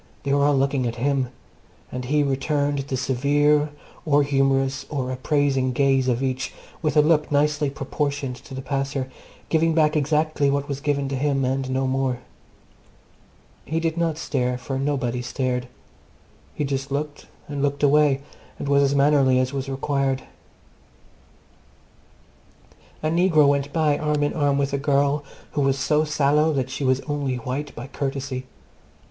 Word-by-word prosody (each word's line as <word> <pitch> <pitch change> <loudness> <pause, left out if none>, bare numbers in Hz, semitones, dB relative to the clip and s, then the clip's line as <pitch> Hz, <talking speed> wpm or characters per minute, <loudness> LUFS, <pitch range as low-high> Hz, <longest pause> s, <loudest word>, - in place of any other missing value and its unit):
They 140 - 0
were 140 0 +3
all 145 -1 +3
looking 135 -2 +1
at 115 - -3
him; 135 +1 0 0.6
and 125 0 -4
he 145 +3 +2
returned 145 +1 0
the 135 -1 -3
severe, 145 +4 +2 0.3
or 145 -2 +3
humourous, 135 -1 +1
or 130 -3 -2
appraising 135 -1 +1
gaze 135 0 +2
of 125 +1 +1
each 130 -1 -2 0.3
with 155 -2 0
a 150 - +7
look 150 -1 +2
nicely 145 0 +2
proportioned 140 -1 -3
to 135 - -11
the 130 - -6
passer, 135 -1 -2 0.4
giving 160 0 +2
back 155 -1 +3
exactly 150 0 +1
what 140 0 0
was 140 -1 -4
given 140 -1 0
to 135 - -2
him, 135 0 +1
and 130 0 -1
no 130 +1 0
more. 130 -1 0 1.5
He 160 +4 -2
did 165 -1 -1
not 165 -2 0
stare, 125 -5 -1
for 130 +1 -4
nobody 130 -4 -1
stared. 125 0 -2 0.9
He - - -1
just 135 0 -3
looked 145 +1 -4 0.2
and 145 -1 -4
looked 145 0 -1
away, 145 -1 +4 0.4
and - - -5
was 140 0 +4
as 140 0 +2
mannerly 140 -2 +4
as 130 +1 0
was 135 0 -3
required. 135 0 -1 2.8
A 155 - +1
negro 165 -4 +4
went 140 0 +1
by 155 -2 +2
arm 150 -1 0
in 145 - 0
arm 145 -3 +1
with 140 0 0
a 140 - 0
girl 140 +1 +1 0.3
who 145 - -1
was 135 -1 +2
so 150 +3 +2
sallow 150 +1 +2
that 130 -2 -1
she 135 - -4
was 130 0 +2
only 145 -3 -2
white 130 +4 -4
by 120 - -6
courtesy. 135 -1 -4
140 Hz, 160 wpm, -23 LUFS, 135-145 Hz, 2.8 s, a